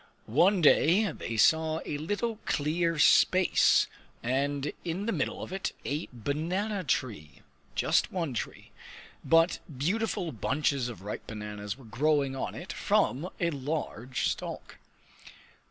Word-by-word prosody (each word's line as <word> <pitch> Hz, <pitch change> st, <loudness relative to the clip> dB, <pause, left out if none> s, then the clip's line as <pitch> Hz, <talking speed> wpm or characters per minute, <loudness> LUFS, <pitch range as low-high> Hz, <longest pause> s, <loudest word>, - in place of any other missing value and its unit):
One 175 Hz, -, +3 dB
day 180 Hz, +7 st, +5 dB
they 115 Hz, -, -5 dB
saw 160 Hz, +6 st, +4 dB
a 145 Hz, -, -3 dB
little 205 Hz, +8 st, -2 dB
clear 165 Hz, +3 st, 0 dB
space 185 Hz, +4 st, +5 dB, 0.4 s
and 140 Hz, +3 st, -1 dB
in 175 Hz, +4 st, -3 dB
the 230 Hz, -, 0 dB
middle -, -, -2 dB
of -, -, -7 dB
it 190 Hz, -, -3 dB
a 150 Hz, +4 st, -3 dB
banana 175 Hz, -, -2 dB
tree 105 Hz, -, -3 dB, 0.3 s
just -, -, +2 dB
one 165 Hz, -7 st, -2 dB
tree. -, -, -6 dB, 0.5 s
But 165 Hz, +1 st, +4 dB, 0.2 s
beautiful 185 Hz, -, -1 dB
bunches 130 Hz, +2 st, 0 dB
of 100 Hz, -6 st, -9 dB
ripe 105 Hz, -, -6 dB
bananas 105 Hz, 0 st, -6 dB
were 135 Hz, -, -15 dB
growing 140 Hz, +3 st, +1 dB
on 135 Hz, -, -4 dB
it -, -, -7 dB
from 155 Hz, +8 st, +1 dB
a 170 Hz, -2 st, +1 dB
large 135 Hz, -4 st, -3 dB
stalk. -, -, -5 dB
150 Hz, 130 wpm, -29 LUFS, 125-175 Hz, 0.5 s, day